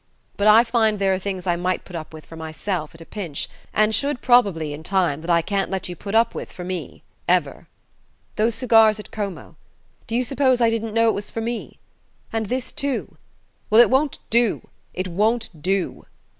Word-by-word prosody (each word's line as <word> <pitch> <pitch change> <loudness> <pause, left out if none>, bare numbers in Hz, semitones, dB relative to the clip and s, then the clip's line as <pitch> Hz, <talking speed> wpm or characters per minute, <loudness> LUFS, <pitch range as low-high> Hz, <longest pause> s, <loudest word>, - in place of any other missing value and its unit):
But 205 - +1
I 220 +2 +8
find 225 -3 +1
there 195 -1 +2
are 185 - -1
things 190 -1 -4
I 175 -2 +2
might 180 +1 -2
put 180 - -10
up 160 -2 -6
with 155 -1 -11
for 165 - -12
myself, 160 +1 -4
at 165 - -13
a - - -10
pinch 175 -9 -4 0.2
and 215 0 +2
should, 280 +2 +1
probably, 195 -12 +3
in 145 - -8
time 170 -4 0
that 165 - -8
I 170 -1 +4
can't 200 +1 -1
let 190 -1 -3
you 175 - -5
put 200 +5 -5
up 230 +1 +4
with - - -6
for 180 - -8
me... 185 0 -6 0.2
ever.... - - +1 0.7
Those 220 +1 +1
cigars 225 -4 +5
at 210 - -10
Como: 195 -6 -6 0.5
do 225 - -3
you 250 - +2
suppose 260 0 +2
I 230 -1 +4
didn't 225 -1 -3
know 230 0 +4
it - - +2
was 205 - -4
for - - -5
me? 235 +1 -4 0.6
And 220 -1 -1
this 250 +3 -2
too? 280 -3 -2 0.5
Well, 215 - +6
it 240 - +7
won't 275 +2 +2
do... 235 -2 +2 0.2
it 185 0 -3
won't 210 -2 -1
do...." 190 +2 -1
205 Hz, 205 wpm, -22 LUFS, 180-230 Hz, 0.7 s, I